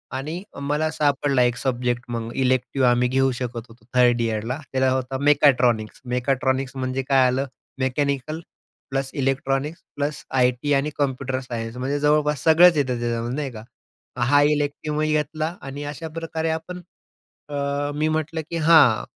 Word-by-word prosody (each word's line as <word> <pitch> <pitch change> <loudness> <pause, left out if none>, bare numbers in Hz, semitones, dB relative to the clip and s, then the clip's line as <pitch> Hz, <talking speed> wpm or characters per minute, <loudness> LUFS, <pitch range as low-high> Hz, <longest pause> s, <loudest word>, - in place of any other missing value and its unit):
आणि 155 +7 -4 0.2
मला 150 +2 0
सापडला 145 -3 +1
एक 120 0 +1
सब्जेक्ट 125 -2 -1
मग. 115 0 -4
इलेक्टिव 130 0 +1
आम्ही 125 0 +3
घेऊ 135 +1 +2
शकत 120 -2 -5
होतो 115 0 -18
3 120 -1 +4
इअरला. 115 +2 -2
त्याला 130 0 +2
होता 130 0 -1
मेकॅट्रॉनिक्स. 130 -6 +3
मेकाट्रॉनिक्स 130 +1 -1
म्हणजे 130 0 -2
काय 135 -2 +5
आलं, 130 +2 0 0.3
mechanical 140 +3 -1 0.5
plus 135 0 -2
electronics 135 +3 -1
plus 145 +1 -3 0.2
IT 125 +3 +2
आणि 140 +2 +1
कॉम्प्युटर 135 -2 -1
सायन्स. 120 -2 -6
म्हणजे 135 +3 -1
जवळपास 150 -1 +2
सगळंच 165 +1 +6
येतं 130 -4 0
त्याच्यामध्ये, 120 +1 -2
नाही 145 -2 -3
का? 110 -2 -9 0.6
हा 145 +4 +4
इलेक्टिवही 150 +1 0
घेतला 155 +2 -1
आणि 140 +1 -7
अशाप्रकारे 160 +1 -4
आपण 160 +3 -4 0.7
अ, 145 0 -2
मी 155 +1 +1
म्हटलं, 160 +1 -2
की 170 - -3
हां 155 -8 +5
135 Hz, 145 wpm, -23 LUFS, 125-150 Hz, 0.7 s, सगळंच